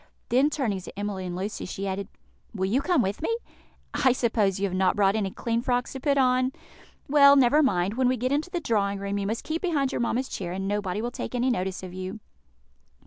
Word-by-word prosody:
Then, 265 Hz, +5 st, +4 dB
turning 235 Hz, -11 st, -1 dB
to 190 Hz, -, -10 dB
Emily 200 Hz, -3 st, -3 dB
and 175 Hz, -, -4 dB
Lucy, 195 Hz, +3 st, -4 dB
she 195 Hz, +2 st, -4 dB
added, 195 Hz, +1 st, -3 dB, 0.5 s
"Will 190 Hz, -2 st, 0 dB
you 230 Hz, +8 st, +1 dB
come 345 Hz, -5 st, +2 dB
with 195 Hz, +7 st, -3 dB
me? 460 Hz, +9 st, 0 dB, 0.6 s
I 260 Hz, -, +3 dB
suppose 215 Hz, -6 st, +1 dB
you 200 Hz, -, +1 dB
have 190 Hz, -, -3 dB
not 185 Hz, 0 st, +2 dB
brought 200 Hz, 0 st, +3 dB
any 205 Hz, -3 st, 0 dB
clean 230 Hz, +4 st, -2 dB
frocks 245 Hz, 0 st, -1 dB
to 265 Hz, -, -5 dB
put 280 Hz, +1 st, +1 dB
on? 255 Hz, 0 st, +3 dB, 0.5 s
Well, 280 Hz, 0 st, +7 dB
never 275 Hz, +3 st, +5 dB
mind; 195 Hz, -8 st, +1 dB
when 255 Hz, +2 st, +2 dB
we 255 Hz, 0 st, +2 dB
get 255 Hz, +3 st, -1 dB
into 295 Hz, +5 st, 0 dB
the 360 Hz, -1 st, -2 dB
drawing 200 Hz, -7 st, 0 dB
room 200 Hz, +1 st, -3 dB
you 195 Hz, -, -2 dB
must 220 Hz, +2 st, -2 dB
keep 320 Hz, +1 st, -3 dB
behind 290 Hz, -7 st, 0 dB
your -, -, -2 dB
mamma's 240 Hz, +2 st, 0 dB
chair, 175 Hz, -2 st, -5 dB
and 195 Hz, +1 st, -3 dB
nobody 205 Hz, 0 st, -2 dB
will 240 Hz, -, -2 dB
take 250 Hz, -, -5 dB
any 250 Hz, +1 st, +2 dB
notice 190 Hz, -4 st, -2 dB
of 180 Hz, -1 st, -7 dB
you." 185 Hz, +3 st, -6 dB
225 Hz, 230 wpm, -26 LUFS, 195-260 Hz, 0.6 s, Well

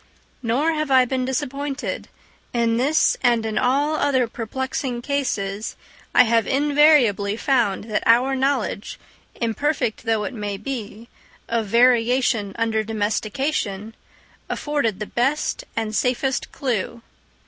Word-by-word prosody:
Nor 260 Hz, +7 st, +1 dB
have 305 Hz, -2 st, -2 dB
I 260 Hz, -1 st, +5 dB
been 255 Hz, 0 st, -1 dB
disappointed; 275 Hz, +1 st, -3 dB, 0.5 s
in 230 Hz, -1 st, +1 dB
this 285 Hz, +6 st, +2 dB
and 235 Hz, -2 st, +2 dB
in 220 Hz, -1 st, -1 dB
all 280 Hz, +5 st, +2 dB
other 280 Hz, -5 st, +1 dB
perplexing 245 Hz, +2 st, -4 dB
cases 215 Hz, -7 st, -2 dB, 0.4 s
I -, -, +8 dB
have 230 Hz, -2 st, +2 dB
invariably 275 Hz, -8 st, +3 dB
found 240 Hz, -8 st, +1 dB
that 215 Hz, -1 st, -2 dB
our 245 Hz, +4 st, +4 dB
knowledge, 265 Hz, -6 st, -1 dB, 0.4 s
imperfect 235 Hz, +1 st, -1 dB
though 225 Hz, -2 st, +1 dB
it 205 Hz, -5 st, -5 dB
be, 230 Hz, -3 st, -6 dB, 0.4 s
of 230 Hz, -2 st, -1 dB
variation 235 Hz, -2 st, +3 dB
under 225 Hz, -1 st, 0 dB
domestication, 215 Hz, 0 st, -2 dB, 0.6 s
afforded 285 Hz, -9 st, -1 dB
the 215 Hz, -, -3 dB
best 295 Hz, -, -1 dB
and 220 Hz, -1 st, -2 dB
safest 255 Hz, +2 st, 0 dB
clue. 235 Hz, -3 st, -3 dB
240 Hz, 115 wpm, -22 LUFS, 220-270 Hz, 0.6 s, I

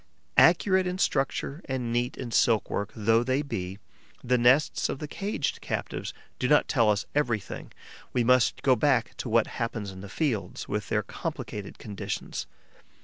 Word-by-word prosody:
Accurate 185 Hz, +2 st, +5 dB
in 180 Hz, 0 st, -2 dB
structure 140 Hz, -1 st, 0 dB
and 125 Hz, -4 st, -2 dB
neat 120 Hz, +1 st, 0 dB
in 125 Hz, -3 st, -5 dB
silk 115 Hz, -1 st, +3 dB
work 100 Hz, 0 st, -2 dB
though 115 Hz, +1 st, +3 dB
they 130 Hz, +3 st, 0 dB
be, 95 Hz, -9 st, -4 dB, 0.5 s
the 125 Hz, +1 st, +2 dB
nests 125 Hz, +5 st, +3 dB
of -, -, -2 dB
the 150 Hz, -, -5 dB
caged 195 Hz, -1 st, -2 dB
captives -, -, -3 dB, 0.3 s
do 125 Hz, -, +1 dB
not 150 Hz, +3 st, +4 dB
tell 115 Hz, -5 st, +3 dB
us 105 Hz, -1 st, +1 dB
everything; 120 Hz, -8 st, -2 dB, 0.4 s
we 125 Hz, -, +1 dB
must 125 Hz, 0 st, +3 dB
go 130 Hz, -2 st, +5 dB
back 130 Hz, -4 st, +2 dB
to 125 Hz, -, -4 dB
what 115 Hz, 0 st, +4 dB, 0.2 s
happens 115 Hz, -4 st, -2 dB
in 95 Hz, 0 st, -10 dB
the 100 Hz, -, -9 dB
fields, 125 Hz, -3 st, -2 dB
with -, -, -3 dB
their -, -, +1 dB
complicated 105 Hz, -2 st, -6 dB
conditions. 105 Hz, -3 st, -5 dB
125 Hz, 165 wpm, -27 LUFS, 110-140 Hz, 0.5 s, Accurate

